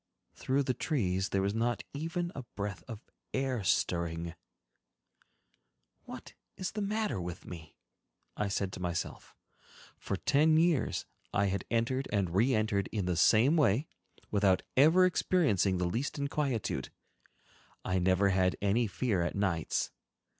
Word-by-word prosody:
Through 135 +2 0
the 130 - 0
trees 95 - -1
there 95 -1 0
was 100 +1 0
not 115 0 0
even 165 +4 -3
a 135 - -5
breath 100 -2 -4
of 115 -2 -8 0.3
air 130 -4 -1
stirring. 85 -2 0 1.7
"What - - -9 0.2
is 185 - -3
the 210 - -4
matter 210 - -1
with 85 0 -6
me?" 80 -3 -10 0.6
I 105 - -1
said 100 -1 -2
to - - -6
myself. 85 -1 -4 0.6
For - - -3
ten 155 +2 +3
years 160 -8 +2 0.3
I 100 - +2
had 100 - -3
entered 120 +3 0
and 100 -5 0
re 115 +7 +3
entered 110 -3 0
in 105 -4 -2
the 90 -1 0
same 120 - +5
way, 140 -1 +3 0.5
without 100 -3 +3
ever 160 +7 +6
experiencing 145 - +2
the 90 - 0
least 120 - -2
inquietude. 135 - -2 1.0
I 95 0 +1
never 95 +2 +3
had 95 -1 +2
any 105 +4 +2
fear 100 -1 0
at 85 - -2
nights. 95 -5 0
105 Hz, 140 wpm, -31 LUFS, 95-140 Hz, 1.7 s, ever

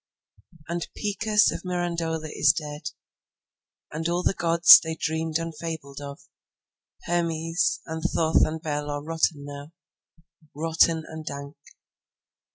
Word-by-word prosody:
…And 170 0 -3
Picus 210 0 +2
of - - -5
Mirandola 170 -3 -2
is 145 - +4
dead; 150 -1 -5 1.0
And 160 +2 -3
all 175 +1 -1
the - - +2
gods 170 -1 +8
they 160 0 -5
dreamed 160 0 -1
and 165 0 -5
fabled 150 -3 -6
of, 140 +1 -8 0.8
Hermes, 165 0 0
and 160 0 -5
Thoth 165 -1 +2
and 160 +1 -1
Bêl 150 -1 -3
are 145 0 -4
rotten 160 -2 -1
now, 145 +2 -9 0.8
Rotten 165 +1 +2
and 160 0 -8
dank. 140 -1 -7
160 Hz, 125 wpm, -25 LUFS, 150-170 Hz, 1.0 s, gods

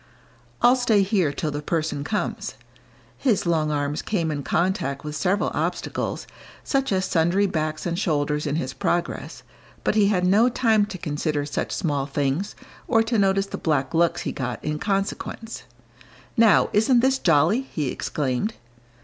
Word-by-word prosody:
"I'll 245 +1 +7
stay 225 -5 +3
here 190 -6 +1
till 150 +2 -3
the 145 0 -4
person 155 -2 -2
comes." 210 +8 -3 0.6
His 230 -10 +1
long 160 -3 +1
arms 145 0 -1
came 170 -7 -1
in 145 -1 -3
contact 165 -3 -1
with 150 0 -5
several 190 +5 +1
obstacles, - - -2 0.4
such 270 -3 0
as 190 -1 +1
sundry 175 +4 +2
backs 155 -4 -2
and 170 0 -1
shoulders 150 -5 0
in 145 - -1
his 135 -4 -2
progress, 170 +6 -2 0.4
but - - +2
he 210 -2 +4
had 185 -3 +2
no 210 +7 +5
time 225 -4 +2
to 195 - -7
consider 150 -2 -2
such 145 - -3
small 145 -6 -1
things 145 +7 -1 0.3
or 225 0 +4
to 225 -1 0
notice 195 0 +2
the 195 - -7
black 140 -5 0
looks 170 +1 +2
he - - -2
got 125 -2 -4
in 150 0 -2
consequence. 200 +3 -3 0.7
"Now, 225 -5 +5
isn't 235 +3 +4
this 265 +1 +2
jolly!" 165 - +3
he 150 - -3
exclaimed. 145 - -2
170 Hz, 160 wpm, -24 LUFS, 150-205 Hz, 0.7 s, I'll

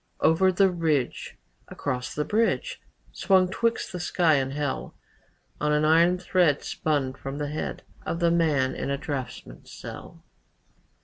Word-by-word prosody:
Over 175 +4 +4
the 190 +1 +3
ridge, 155 -7 -1 0.3
Across 125 -3 -4
the 150 - -1
bridge, 230 - 0 0.3
Swung 190 -2 +3
twixt 230 +4 -1
the 180 - -5
sky 175 -2 +2
and 135 -2 +1
hell, 145 -1 -3 0.6
On 150 0 +1
an 150 0 +2
iron 170 +3 +5
thread 180 -5 +2
Spun 145 -4 -1
from 135 +1 -7
the 145 -1 -3
head 150 - -4 0.2
Of 170 - -3
the 170 -1 +3
man 150 -6 +2
in - - -4
a 140 - 0
draughtsman's 130 - -6
cell. - - -10
155 Hz, 145 wpm, -26 LUFS, 140-180 Hz, 0.6 s, iron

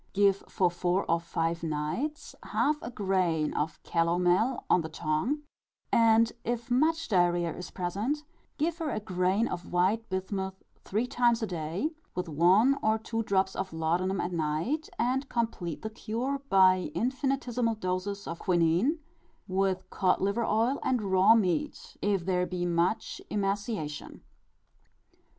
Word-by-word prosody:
Give, 200 -1 +4
for 180 -2 +1
four 175 +2 0
or 170 - +2
five 165 0 -2
nights 165 - -3
half 300 0 +1
a - - -5
grain 185 -8 0
of 155 +2 -2
calomel 175 +8 +1
on 180 - +4
the 160 - -5
tongue; 160 - -1 0.5
and 230 0 +5
if 240 +1 -3
much 320 +6 +2
diarrhœa 175 -3 +2
is 180 - -7
present, 205 +12 -2 0.3
give 325 +3 -1
her 320 -2 -2
a 215 - -2
grain 190 +2 +1
of 175 -1 -6
white 195 +6 +1
bismuth 190 0 -3 0.2
three 215 +5 -1
times 240 -2 +2
a - - +2
day, 175 - -3 0.2
with 180 0 -2
one 185 - +4
or 220 0 +2
two 225 +1 -3
drops 190 -3 +1
of 190 -2 -4
laudanum 175 +4 0
at 175 - -2
night; 170 - -1
and 260 +3 0
complete 225 -9 -2
the 220 - -4
cure 240 +5 -3
by 185 -3 +5
infinitesimal 250 -2 0
doses 200 +1 -3
of 165 - -5
quinine, 175 - +2 0.5
with 190 0 0
cod 185 -2 +2
liver 200 +4 0
oil 230 +6 +1
and 250 -4 0
raw 190 +4 +6
meat, 180 -8 -1
if 200 -4 0
there 180 -1 +1
be 180 -1 -2
much 175 +4 0
emaciation. 200 -6 -3
195 Hz, 145 wpm, -29 LUFS, 175-230 Hz, 0.5 s, raw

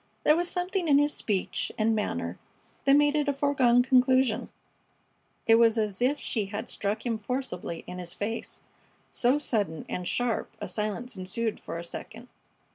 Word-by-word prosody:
There 300 - +6
was 350 +1 0
something 360 0 -1
in 285 -2 +6
his 290 +1 +3
speech 200 -4 -1
and 225 +1 +2
manner 210 - -2 0.5
that 275 0 +6
made 290 0 +4
it 300 -1 +1
a 285 - +2
foregone 265 -4 +3
conclusion. 255 -2 +3 1.0
It 225 0 +6
was 230 -1 +5
as 210 -2 -1
if 275 +4 +2
she 215 -4 -2
had 205 +2 -5
struck 205 +4 -2
him 230 -2 -1
forcibly 220 -8 -4
in 180 - -7
his 175 -1 -4
face, 225 +3 -4 0.5
so 250 +3 +2
sudden 205 - -1
and 180 -1 -4
sharp 245 +2 -1
a - - -4
silence 215 +3 -3
ensued 210 +4 -2
for - - -6
a 170 - -5
second. 225 +7 -8
235 Hz, 170 wpm, -28 LUFS, 210-275 Hz, 1.0 s, There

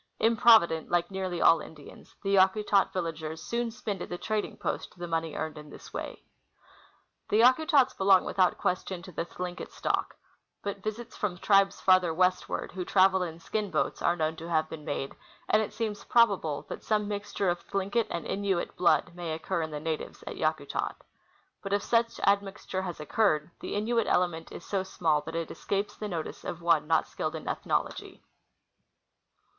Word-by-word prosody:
Improvident, 220 -8 +5
like 175 +1 +1
nearly 185 -2 -3
all 165 - +7
Indians, 150 -3 -13
the 195 0 0
Yakutat 195 +1 +4
villagers 160 -3 -4
soon 235 0 -1
spend 210 -4 -5
at - - -5
the 175 - -4
trading 215 +2 -2
post - - -4
the 175 0 -5
money 165 -2 -2
earned 160 -1 -4
in 150 0 -12
this - - -12
way. - - -6 1.1
The 215 - +4
Yakutats 265 +1 +5
belong 190 -1 +5
without 185 -2 +2
question 180 0 -2
to 185 - -10
the 165 - -3
Thlinket 180 0 -6
stock; - - -2 0.5
Ijut 200 0 -3
visits 215 +3 -5
from 190 -4 -2
tribes 195 +1 +3
farther 185 -2 +5
westward, 185 +1 0
who 180 0 -4
travel 190 +1 +4
in 165 -3 -3
skin 210 +4 -2
boats, - - -1
are 175 - +3
known 160 -1 -1
to 165 +1 -7
have 155 -2 +2
been 155 -1 -8
made, 140 -1 -3 0.4
and 215 - +4
it 215 - -3
seems 215 -3 -3
probable 200 -11 +2
that - - -6
some 210 -1 +1
mixture 205 -2 -2
of 175 - -3
Thlinket 200 +3 0
and 170 -2 -4
Innuit 195 -3 -1
blood 175 0 +3
may 170 -2 -4
occur 170 +2 -2
in 160 - -3
the 150 -1 -5
natives 160 0 -4
at - - -6
Yakutat. - - -1 0.7
But 195 0 -3
if 200 - +1
such 230 0 +1
admixture 195 -1 0
has 180 -3 -5
occurred, 155 -2 +1
the - - -5
Innuit 230 +2 +1
ele 180 - +4
ment 165 -1 -9
is - - -9
so 195 -2 -1
small 165 -5 0
that 165 - -5
it 165 -1 -3
escapes 200 +1 -2
the 215 - -5
notice 170 -5 -5
of 170 - -5
one 165 -3 +2
not 165 - +3
skilled - - -3
in - - -7
ethnology. - - -2
185 Hz, 180 wpm, -29 LUFS, 165-205 Hz, 1.1 s, all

